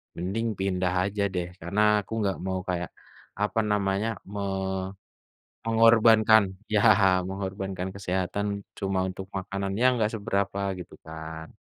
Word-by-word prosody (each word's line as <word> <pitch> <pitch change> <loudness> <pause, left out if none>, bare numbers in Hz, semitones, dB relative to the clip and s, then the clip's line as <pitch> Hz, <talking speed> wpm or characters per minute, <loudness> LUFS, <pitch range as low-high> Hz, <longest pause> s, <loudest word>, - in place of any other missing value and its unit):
mending 100 +7 -2
pindah 90 -1 0
aja 100 +1 -2
deh, 90 -1 -1
karena 100 +5 0 0.2
aku 100 - -25
nggak 100 -2 0
mau 95 -1 -1
kayak 90 -1 -2 0.5
apa 105 +2 +1
namanya, 100 +1 +1 1.4
me-mengorbankan 115 -1 +5 0.3
ya 105 - +5 0.5
mengorbankan 95 -1 -4
kesehatan 95 +1 -2 0.3
cuma 95 -1 0
untuk 95 +1 -6
makanan 100 +1 -3
yang 130 - +6
nggak 110 -2 +1
seberapa 100 -1 -1 0.2
gitu 90 - -10
kan. 80 0 -7
95 Hz, 120 wpm, -27 LUFS, 95-105 Hz, 1.4 s, yang